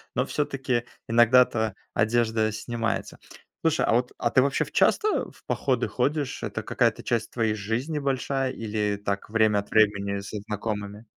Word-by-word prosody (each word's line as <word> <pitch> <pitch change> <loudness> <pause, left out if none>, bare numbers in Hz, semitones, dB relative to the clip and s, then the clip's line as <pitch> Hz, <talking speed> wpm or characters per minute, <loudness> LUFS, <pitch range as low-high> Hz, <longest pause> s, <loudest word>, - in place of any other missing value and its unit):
но 125 - +1
всё-таки 135 -5 -1 0.2
иногда-то 115 -2 +4 0.2
одежда 110 -1 +2
снимается. 115 +1 -3 0.4
Слушай, 160 -1 +2
а - - +2
вот, 125 +2 +1
а - - 0
ты 130 - +4
вообще 140 +1 +1
в - - -15
часто 430 -1 +2
в - - -23
походы 130 -3 0
ходишь, 140 +2 -1
это - - -3
какая-то - - +1
часть 115 -2 -1
твоей 115 -3 0
жизни 115 +9 -2
большая 135 -1 -1
или 105 -3 -2
так 100 0 -2
время 110 -2 +3
от 100 - -8
времени 100 -2 +2
со 100 +2 -6
знакомыми? 105 0 -5
115 Hz, 155 wpm, -26 LUFS, 105-130 Hz, 0.4 s, иногда-то